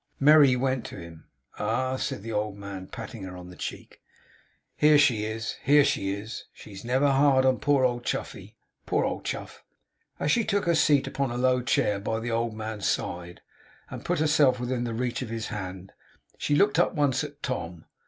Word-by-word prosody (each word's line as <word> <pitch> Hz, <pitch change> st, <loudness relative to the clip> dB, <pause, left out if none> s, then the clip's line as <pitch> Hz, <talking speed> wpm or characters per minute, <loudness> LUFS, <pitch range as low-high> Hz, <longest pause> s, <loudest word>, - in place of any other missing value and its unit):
Merry 145 Hz, -2 st, +7 dB
went 130 Hz, -1 st, 0 dB
to -, -, -8 dB
him. 85 Hz, -2 st, -11 dB, 0.3 s
'Ah!' 130 Hz, 0 st, 0 dB
said 100 Hz, -, -4 dB
the 115 Hz, -, -5 dB
old 105 Hz, -1 st, -2 dB
man, 100 Hz, -2 st, -7 dB
patting 115 Hz, -1 st, -8 dB
her 95 Hz, -1 st, -7 dB
on 90 Hz, 0 st, -10 dB
the -, -, -12 dB
check. -, -, -7 dB, 0.8 s
'Here 150 Hz, 0 st, +5 dB
she 125 Hz, -8 st, +3 dB
is. 110 Hz, +1 st, -4 dB
Here 145 Hz, +1 st, +5 dB
she 120 Hz, -9 st, 0 dB
is! 105 Hz, +4 st, -6 dB
She's 100 Hz, -2 st, -12 dB
never 130 Hz, +4 st, +2 dB
hard 135 Hz, -1 st, +4 dB
on 130 Hz, -1 st, +3 dB
poor 145 Hz, -3 st, +2 dB
old 120 Hz, -1 st, -1 dB
Chuffey. -, -, -5 dB, 0.3 s
Poor -, -, +1 dB
old -, -, -3 dB
Chuff!' -, -, -5 dB, 0.6 s
As 150 Hz, -, +1 dB
she 235 Hz, -, +3 dB
took 200 Hz, -2 st, 0 dB
her 170 Hz, -, +3 dB
seat 145 Hz, -4 st, +3 dB
upon 140 Hz, -2 st, -2 dB
a 120 Hz, -, -4 dB
low 125 Hz, 0 st, +2 dB
chair 105 Hz, -4 st, +1 dB
by 110 Hz, +2 st, -2 dB
the 120 Hz, +1 st, -4 dB
old 115 Hz, -1 st, -1 dB
man's 110 Hz, -2 st, -4 dB
side, 90 Hz, 0 st, -3 dB, 0.5 s
and -, -, -7 dB
put -, -, 0 dB
herself 150 Hz, -4 st, +3 dB
within 125 Hz, 0 st, -2 dB
the 115 Hz, -1 st, -3 dB
reach 125 Hz, +2 st, -2 dB
of 125 Hz, -, -5 dB
his 115 Hz, 0 st, -4 dB
hand, 95 Hz, -3 st, -6 dB, 0.4 s
she 145 Hz, -, 0 dB
looked 205 Hz, +7 st, +3 dB
up -, -, +2 dB
once 145 Hz, -3 st, +1 dB
at 145 Hz, 0 st, -9 dB
Tom. 90 Hz, -, -4 dB
120 Hz, 195 wpm, -27 LUFS, 105-140 Hz, 0.8 s, Merry